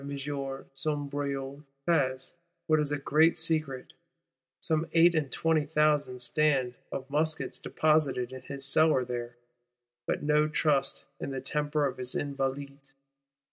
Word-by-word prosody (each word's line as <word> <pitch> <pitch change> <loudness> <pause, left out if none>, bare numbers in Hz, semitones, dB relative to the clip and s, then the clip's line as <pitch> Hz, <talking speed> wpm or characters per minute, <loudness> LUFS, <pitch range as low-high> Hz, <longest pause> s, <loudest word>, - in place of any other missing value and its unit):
M. - - -8
de 140 - -5 0.6
Sombreuil 140 -1 -3 0.2
has, 135 -6 0 0.3
what 155 -2 +3
is 150 -1 0
a 145 - 0
great 155 +4 +3
secret, 155 -5 +2 0.7
some 160 0 0
eight 170 +1 +5
and 150 -5 -1
twenty 160 -2 +1
thousand 150 -4 +1
stand 135 -3 +1 0.2
of 135 0 -5
muskets 155 +2 +1
deposited 150 -5 +1
in 130 - -8
his 140 -1 -4
cellars 140 -3 +4
there; 120 -1 -5 0.7
but - - -2
no 150 +1 +3
trust 145 -3 0
in - - -5
the 135 -1 -4
temper 150 +2 -1
of 135 -2 -3
his 125 0 -2
Invalides. 140 0 -4
145 Hz, 140 wpm, -29 LUFS, 135-155 Hz, 0.7 s, eight